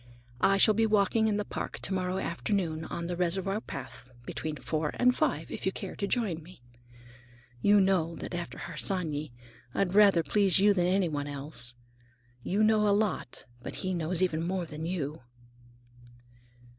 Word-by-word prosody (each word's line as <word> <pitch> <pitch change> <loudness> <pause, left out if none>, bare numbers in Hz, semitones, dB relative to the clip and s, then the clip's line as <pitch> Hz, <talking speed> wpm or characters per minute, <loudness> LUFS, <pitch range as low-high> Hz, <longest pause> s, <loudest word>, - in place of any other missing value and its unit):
"I 195 - +4
shall 215 +2 +6
be 225 +1 +2
walking 215 +1 +3
in 210 -1 +1
the 210 - -2
Park - - -5
to 190 - -1
morrow 185 0 -1
afternoon, 170 -3 -2
on 170 +1 -4
the 175 +1 -3
reservoir 190 +4 0
path, 135 - -8 0.2
between 155 +3 -4
four 155 0 -2
and 250 0 +3
five, - - -1
if - - -6
you - - +2
care - - -6
to 200 - -2
join 200 -8 -1
me. 165 -5 -16 1.0
You 205 0 +5
know 185 -4 +2
that - - -7
after 175 0 -5
Harsanyi 155 -6 -2 0.4
I'd 190 -2 +1
rather 200 -5 +6
please 200 0 +4
you 205 +1 +5
than 180 -2 +1
anyone 170 -6 0
else. 140 -4 -3 0.7
You 200 - +1
know 215 -1 +4
a 200 0 +4
lot, 205 - -2 0.2
but - - -6
he 185 - 0
knows 175 +1 0
even 160 -3 0
more 180 +1 -2
than 155 +1 -6
you." 155 -5 -3
180 Hz, 170 wpm, -29 LUFS, 160-200 Hz, 1.0 s, shall